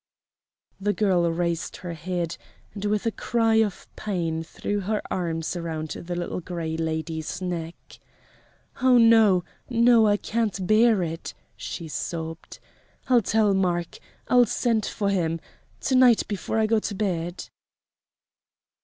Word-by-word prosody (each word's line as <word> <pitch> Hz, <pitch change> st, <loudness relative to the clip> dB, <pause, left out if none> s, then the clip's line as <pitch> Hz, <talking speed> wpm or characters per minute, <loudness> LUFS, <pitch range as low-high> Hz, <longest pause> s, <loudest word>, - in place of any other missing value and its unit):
The 205 Hz, +1 st, 0 dB
girl 180 Hz, -6 st, +2 dB
raised 170 Hz, 0 st, -2 dB
her 175 Hz, -2 st, -6 dB
head, 170 Hz, 0 st, -3 dB, 0.4 s
and 205 Hz, 0 st, -5 dB
with 210 Hz, +1 st, 0 dB
a 230 Hz, -, +2 dB
cry 225 Hz, 0 st, +1 dB
of 215 Hz, -4 st, 0 dB
pain 170 Hz, -6 st, -2 dB
threw 205 Hz, +5 st, -3 dB
her 210 Hz, +2 st, -1 dB
arms 165 Hz, -2 st, -2 dB
around 160 Hz, -2 st, -4 dB
the 175 Hz, +1 st, -5 dB
Little 175 Hz, +1 st, -3 dB
Gray 165 Hz, -2 st, -4 dB
Lady's 160 Hz, +1 st, -3 dB
neck: 170 Hz, -2 st, -4 dB, 1.1 s
"Oh, 255 Hz, -1 st, +6 dB
no! 225 Hz, -6 st, +6 dB, 0.3 s
no! 235 Hz, -2 st, +5 dB
I 205 Hz, 0 st, +3 dB
can't 210 Hz, -4 st, -2 dB
bear 215 Hz, -1 st, +4 dB
it!" 165 Hz, 0 st, -5 dB, 0.2 s
she 170 Hz, -, -6 dB
sobbed! 165 Hz, +1 st, -5 dB, 0.5 s
"I'll 245 Hz, -2 st, +5 dB
tell 210 Hz, 0 st, +2 dB
Mark! 175 Hz, -3 st, -1 dB, 0.3 s
I'll 245 Hz, -1 st, +5 dB
send 225 Hz, -1 st, 0 dB
for 200 Hz, -2 st, -1 dB
him 165 Hz, -4 st, 0 dB, 0.4 s
to 270 Hz, -, -1 dB
night 255 Hz, -3 st, +5 dB
before 205 Hz, +1 st, -3 dB
I 220 Hz, -, +3 dB
go 220 Hz, 0 st, +2 dB
to 210 Hz, -1 st, -4 dB
bed!" 175 Hz, -4 st, -3 dB
185 Hz, 135 wpm, -25 LUFS, 170-220 Hz, 1.1 s, Oh